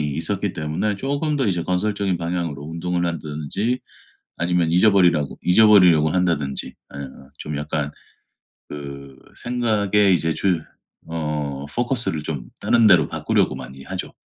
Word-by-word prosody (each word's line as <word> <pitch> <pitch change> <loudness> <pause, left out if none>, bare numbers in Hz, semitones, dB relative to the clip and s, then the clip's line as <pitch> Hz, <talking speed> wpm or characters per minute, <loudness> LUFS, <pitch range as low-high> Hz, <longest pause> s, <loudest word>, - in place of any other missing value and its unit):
있었기 100 +4 -2
때문에 80 +7 -2
쪼금 145 +5 -1
더 130 - +1
이제 90 -4 0
건설적인 95 0 0
방향으로 85 -4 -3
운동을 85 +3 -2
한다든지 85 - -2 0.6
아니면 85 -1 +1
잊어버리라고 90 -6 +3
잊어버리려고 90 -5 +6
한다든지 85 -7 -1 0.2
예 70 - -6 0.4
좀 75 -1 -5
약간 75 0 -2 0.8
그 70 -2 -8 0.3
생각의 105 -5 +2
이제 80 -1 0
주 90 -3 0 0.5
어 75 -4 -3
포커스를 120 - -1
좀 70 -7 -5
다른 115 -2 +4
데로 90 -4 +6
바꾸려고 - - 0
많이 65 +1 -9
하죠. 90 +5 -6
85 Hz, 310 characters per minute, -22 LUFS, 75-100 Hz, 0.8 s, 잊어버리려고